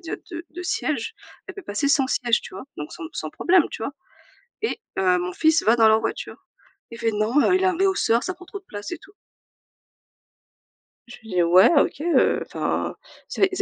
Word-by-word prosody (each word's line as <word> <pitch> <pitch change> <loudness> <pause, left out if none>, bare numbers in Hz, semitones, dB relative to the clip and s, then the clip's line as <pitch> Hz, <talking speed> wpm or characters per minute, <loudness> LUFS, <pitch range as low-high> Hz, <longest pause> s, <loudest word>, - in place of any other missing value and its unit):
déjà 335 -2 -5
deu 335 0 -6
deux 355 +3 -7
sièges. 360 - -2 0.3
Elle 390 - -8
peut 395 - -9
passer 245 +3 -1
sans 275 -2 +3
siège, 240 -2 +1
tu - - -11
vois? 190 - -8
Donc 150 - -7
sans 165 - -8
sans 155 - -5
problème, 350 -2 +3
tu - - -7
vois? 250 - -3 0.7
Et 445 - -1 0.2
heu, 185 -1 +3
mon 180 0 -3
fils 315 0 +3
va 225 - +4
dans 225 -2 +5
leur 220 0 +5
voiture. - - -5 0.4
Il 230 - -9
fait: 230 -1 +1
«Non, 215 +6 +1
heu, 370 - +4
il 375 - +1
a - - +5
un 335 - -5
rehausseur, 380 -11 +2
ça 370 - -3
prend 360 0 -15
trop 390 +2 -8
de 385 - -32
place 205 0 -7
et 350 - -4
tout». 400 0 -19 1.9
Je 240 - -11
lui 220 - -14
dis: 180 -3 +2
«Ouais 180 +3 +6
OK, - - 0
heu, 340 +1 +3
enfin, - - -2 0.3
c'est 390 - +2
c'est 375 - -4
270 Hz, 215 wpm, -23 LUFS, -, 1.9 s, Ouais